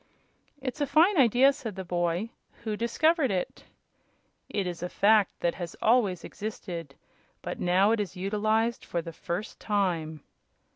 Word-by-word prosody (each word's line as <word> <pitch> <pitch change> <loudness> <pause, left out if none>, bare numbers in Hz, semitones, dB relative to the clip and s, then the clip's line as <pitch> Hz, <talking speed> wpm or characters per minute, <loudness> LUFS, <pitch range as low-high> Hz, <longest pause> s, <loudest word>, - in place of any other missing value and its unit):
"It's 270 +2 -5
a 290 - +1
fine 335 +8 +4
idea," 260 +2 +5
said 235 -8 -7
the 190 - -5
boy; 175 +5 -1 0.3
"who 215 -2 -2
discovered 280 +6 +2
it?" 185 -3 -3 0.8
"It 200 - -1
is 175 -2 -5
a 180 - -3
fact 210 +1 +3
that 170 - +1
has 175 -2 -6
always 215 -6 +2
existed, 175 -8 -6 0.5
but - - -4
is - - -10
now 185 +4 +4 0.2
utilized 215 +4 0
for 170 -1 -3
the 165 -1 -8
first 175 +7 -5
time." 170 -7 -1
205 Hz, 145 wpm, -28 LUFS, 175-235 Hz, 0.8 s, idea